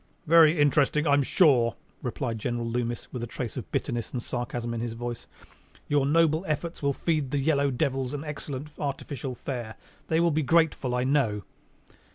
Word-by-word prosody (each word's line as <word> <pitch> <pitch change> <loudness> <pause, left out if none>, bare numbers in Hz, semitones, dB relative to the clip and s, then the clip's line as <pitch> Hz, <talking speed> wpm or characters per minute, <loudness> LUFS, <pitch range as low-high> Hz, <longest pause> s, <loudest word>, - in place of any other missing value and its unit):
"Very 165 0 +6
interesting, 145 +1 +3
I 145 - +4
am 145 - +5
sure," 130 -6 +4 0.3
replied 120 -2 -3
General 120 +2 -2
Loomis, 120 0 -3
with 125 - -4
a 120 - -3
trace 115 0 -5
of 125 - -7
bitterness 120 -4 -2
and 120 -2 -3
sarcasm 120 -1 -3
in 115 - -3
his 120 -1 -3
voice. 120 0 -6 0.6
"Your 145 -2 +2
noble 160 +2 +3
efforts 165 +3 -3
will 140 - +2
result 140 - -4
in - - -25
feeding 155 -5 +1
the 145 - -1
yellow 140 0 +2
devils 130 +1 -1
an 145 - -5
excellent 150 -1 -6
artificial 140 -2 -4
fare. 120 -4 -5 0.3
They 160 - +2
will 170 0 +3
be 155 +1 +1
grateful, 155 -4 +2
I 125 - +1
know!" 130 -7 +1
135 Hz, 190 wpm, -27 LUFS, 120-150 Hz, 0.6 s, Very